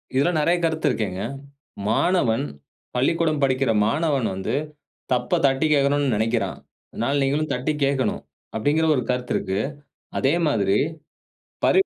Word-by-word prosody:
இதில 140 +6 +3
நிறைய 170 +4 +3
கருத்து 160 -2 +1
இருக்கேங்க. 100 -5 -2 0.7
மாணவன், 120 -3 +2 0.5
பள்ளிக்கூடம் 155 +3 +1
படிக்கிற 130 -2 +2
மாணவன் 145 -3 +1
வந்து, 95 0 -2 0.6
தப்ப 165 +7 +1
தட்டிக் 140 +3 +2
கேட்கணும்னு 140 -2 +2
நினைக்கிறான். 115 +2 0 0.3
அதனால 140 +5 0
நீங்களும் 150 +3 0
தட்டி 130 +5 -1
கேட்கணும், 135 -2 0 0.4
அப்டிங்கிற 155 +7 +2
ஒரு 125 - 0
கருத்து 125 0 -1
இருக்கு. 95 +1 -1 0.6
அதே 135 +4 +3
மாதிரி, 100 -9 +2 0.9
பரிவு 385 - +4
135 Hz, 120 wpm, -23 LUFS, 120-155 Hz, 0.9 s, பரிவு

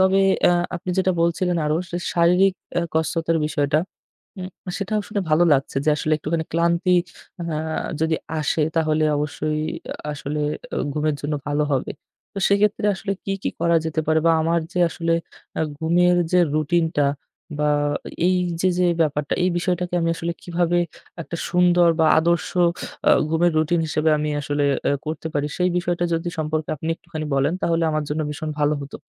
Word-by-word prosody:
তবে 190 +1 +4 0.3
আ - - +4 0.2
আপনি 180 +1 -5
যেটা 185 0 +3
বলছিলেন 175 +1 +1
আরও 150 - +1 0.2
যে - - -1 0.2
শারীরিক 180 +3 +4 0.3
আ - - -1
কসরতের 165 +1 0
বিষয়টা, 145 0 +1 0.6
উম 185 - -5 0.3
সেটাও 210 +2 -1
শুনে 210 -1 -1
ভালো 155 +3 +5
লাগছে 135 0 -2
যে 155 - +4
আসলে 155 +1 -1
একটুখানি 160 +2 -2
ক্লান্তি 170 +2 +2 0.5
হাঁ 160 0 -2 0.2
যদি 160 0 +1 0.2
আসে 155 +1 +1
তাহলে 155 -1 +2
অবশ্যই 150 +1 -2 0.3
আ - - -11 0.2
আসলে 150 +1 -4 0.3
আ - - -3 0.2
ঘুমের 155 0 0
জন্য 150 +1 -1
ভালো 145 +1 +1
হবে। 130 - -1 0.4
তো - - -4
সেক্ষেত্রে 205 +1 +2
আসলে 195 +1 -3
কী, 195 - -2
কী - - -1
করা 170 0 +3
যেতে 160 0 -1
পারে 160 0 +3
বা 165 - +6
আমার 170 +1 +1
যে 180 - -2
আসলে 165 0 -1 0.5
আ - - +2 0.2
ঘুমের 175 +2 +3 0.2
যে 180 - +5 0.2
routine 165 +2 +2
টা 145 - +4 0.5
বা 150 0 +2 0.6
এই 185 0 +3 0.2
যে 185 - +3
যে 180 - +3
ব্যাপারটা, 150 -2 0
এই 185 - +3
বিষয়টাকে 180 0 -1
আমি 165 - +1
আসলে 170 +1 -2
কীভাবে 175 0 0 0.4
একটা 170 - -6
সুন্দর 175 -1 +4
বা 160 - +5
আদর্শ 170 +1 +1 0.6
আ - - +7 0.2
ঘুমের 165 +2 +2
routine 165 +2 +1
হিসেবে 155 +1 +1
আমি 150 0 -1
আসলে 145 +1 -1 0.2
আ - - +2 0.2
করতে 155 +1 -4
পারি? 145 0 0
সেই 180 0 +3
বিষয়টা 175 0 0
যদি 165 +1 -2
সম্পর্কে 155 0 -2
আপনি 160 +3 -5
একটুখানি 160 -2 -7
বলেন 140 +3 +2
তাহলে 165 0 +1
আমার 155 -1 -1
জন্য 150 +2 -2
ভীষণ 155 +1 -4
ভালো 145 +1 +3
হতো। 140 - -8
165 Hz, 175 wpm, -22 LUFS, 155-175 Hz, 0.6 s, আ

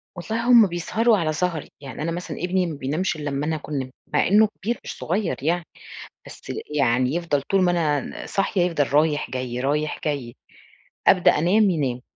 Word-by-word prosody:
والله 225 +7 -3
هم 230 -4 +8
بيسهروا 215 +6 +1
على 155 -3 0
سهري، 165 -1 -2
يعني 140 +1 -8
أنا 165 +2 -1
مثلًا 175 +1 -5
ابني 180 +1 0
ما 165 - -4
بينامش 155 +7 -1
إلَّا 145 -1 -4
أما 140 +2 -2
أنا 160 0 0
أكون 150 -2 -4
نِمت، 130 0 -6 0.2
مع 150 - +3
إنه 210 +3 +5
كبير 235 +4 -2
مش - - -7
صغير 185 +2 -1
يعني، 170 +1 0 0.6
بس - - -12 0.4
يعني 130 +2 +2
يفضل 165 -5 0
طول 195 +6 +1
ما 180 - +3
أنا 150 -5 +1 0.2
ن - - -8
صاحية 195 -1 0
يفضل 160 -6 0
رايح 150 -2 +2
جاي، 125 -1 -4
رايح 150 +3 -1
جاي، 135 -5 -3 0.7
أبدأ 185 -2 +6
أنام، 200 +5 +4
ينام، 135 -7 -1
160 Hz, 190 wpm, -23 LUFS, 145-180 Hz, 0.7 s, هم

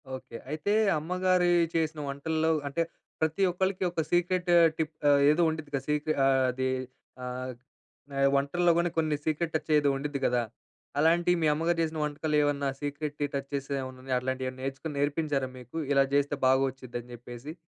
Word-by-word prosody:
Okay. 115 -2 -9
అయితే 155 +6 -2 0.3
అమ్మగా‌రీ 180 +2 +2 0.2
చేసిన 160 -1 0
వంటల్లో, 160 +3 -1 0.2
అంటే 140 +4 -1 0.4
ప్రతి 160 +4 +1
ఒక్కలికి 190 +1 -1
ఒక 170 - -1
సీక్రెట్ 175 +1 +1 0.3
టిప్ 160 -1 -2 0.2
ఆహ్, 140 0 +5
ఏదో 155 +3 +2
ఉండిద్ది 155 -2 -5
కదా! 135 - -2
సీక్రెట్ 150 +1 0
ఆహ్, 135 -1 +4
అది 130 +1 -2 0.6
ఆహ్, 125 +1 -4 0.7
ఆహ్, 135 0 +4
వంటల్లో 170 +5 +2
కాని 170 0 +2
కొన్ని 155 -2 +2
సీక్రెట్ 160 +1 -1
టచ్ 155 - -2
ఏదో 145 -1 +2
ఉండిద్ది 145 0 -3
కదా! 120 0 +2 0.6
అలాంటి 170 +3 +4
మీ 155 - +3
అమ్మగారు 165 +3 0
చేసిన 160 0 -3
వంటకాలు 150 +1 -1
ఏమన్నా 145 -1 0
సీక్రె‌ట్‌ని 145 0 -3
టచ్‌ 140 0 -4
చేసే 140 0 -4
ఏమన్నా 130 -1 -8
ఉన్నాయ? 130 -1 -1
అట్లాంటివి 130 +1 -2
ఏమన్నా 130 0 -10
నేర్చుకొని 135 +3 -4
నేర్పించారా 145 -2 0
మీకు? 125 +6 -9
ఇలా 140 -1 +5
చేస్తే 145 0 +2
బాగొచ్చుది 130 -2 0
అని 120 +1 -13
చెప్పేసి. 120 +4 -9
145 Hz, 165 wpm, -28 LUFS, 135-160 Hz, 0.7 s, ఆహ్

